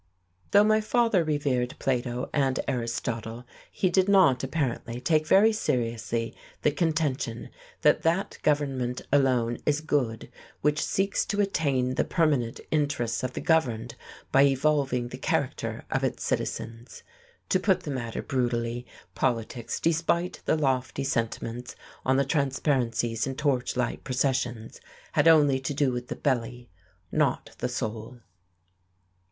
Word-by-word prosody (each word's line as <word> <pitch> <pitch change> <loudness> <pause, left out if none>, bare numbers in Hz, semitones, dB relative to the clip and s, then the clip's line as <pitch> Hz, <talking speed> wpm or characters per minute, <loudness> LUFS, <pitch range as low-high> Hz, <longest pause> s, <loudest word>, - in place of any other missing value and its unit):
Though 205 +1 +6
my 215 +1 +3
father 225 -4 +2
revered 140 -5 0
Plato 125 -1 -1
and 135 -3 +1
Aristotle, 115 -2 -3 0.2
he 185 - 0
did 190 +2 +3
not, 185 -11 +5
apparently, 130 -4 -2
take 155 +3 +1
very 215 +3 +6
seriously 115 - -1 0.3
the 150 - +4
contention 150 -7 -1 0.3
that - - +5
that 170 +5 0
government 135 -5 0
alone 125 -4 +2
is 150 0 +1
good 135 -8 -1 0.3
"which 150 +1 +1
seeks 195 +1 0
to 205 - -2
attain 140 -10 +1
the - - +1
permanent 145 -8 +1
interests 140 -6 0
of 130 0 -3
the - - -4
governed 120 -8 +1 0.4
by 135 - +5
evolving 135 -3 +1
the - - -8
character - - -2
of - - 0
its - - -1
citizens." 115 +2 -4 0.5
To 185 - +3
put 190 0 +2
the 150 - -5
matter 120 -4 -4
brutally, 120 -2 -1 0.3
politics, 120 -2 -2
despite 170 +2 0
the - - +2
lofty 135 -2 0
sentiments 115 -1 -3 0.3
on 130 +1 +2
the 140 - +2
transparencies 130 -5 0
in 135 - -3
torchlight 125 -4 -1
processions, 125 -3 -1 0.3
had - - +3
only 145 -5 +6
to 135 +2 -3
do 140 -2 +2
with 125 0 -4
the - - -4
belly, 120 -3 -2 0.4
not - - 0
the - - -1
soul. 110 +2 -5
130 Hz, 135 wpm, -27 LUFS, 120-150 Hz, 0.5 s, Though